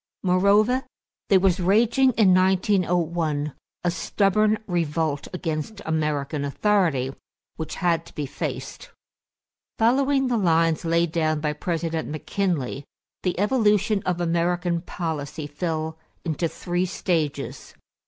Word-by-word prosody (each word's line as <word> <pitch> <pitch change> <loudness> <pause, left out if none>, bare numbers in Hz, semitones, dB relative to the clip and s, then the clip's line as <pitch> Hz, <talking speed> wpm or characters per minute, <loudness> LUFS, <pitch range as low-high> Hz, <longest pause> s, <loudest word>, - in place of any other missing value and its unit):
Moreover, 200 +7 +3 0.5
there 195 - +6
was 190 0 +2
raging 230 +8 +4
in 200 -5 +5
1901 175 -5 +1 0.3
a 175 - +2
stubborn 210 +4 +2
revolt 160 -5 -1
against 175 +3 -4
American 150 -2 -1
authority, 145 -4 +1 0.4
which 160 -2 -5
had 175 -3 0
to - - -16
be 150 - -2
faced. - - -5 0.9
Following 270 +4 +3
the 245 -2 +1
lines 165 -4 +2
laid 170 0 +2
down 155 -2 +1
by 150 0 -1
President 165 +1 -2
McKinley, 155 -3 -2 0.4
the 180 -1 -1
evolution 210 -2 +2
of 180 -1 -1
American 175 0 0
policy 155 -4 -4
fell 160 +1 -3 0.3
into 165 +1 0
three 175 +2 -2
stages. 165 -5 -2
175 Hz, 115 wpm, -24 LUFS, 155-195 Hz, 0.9 s, there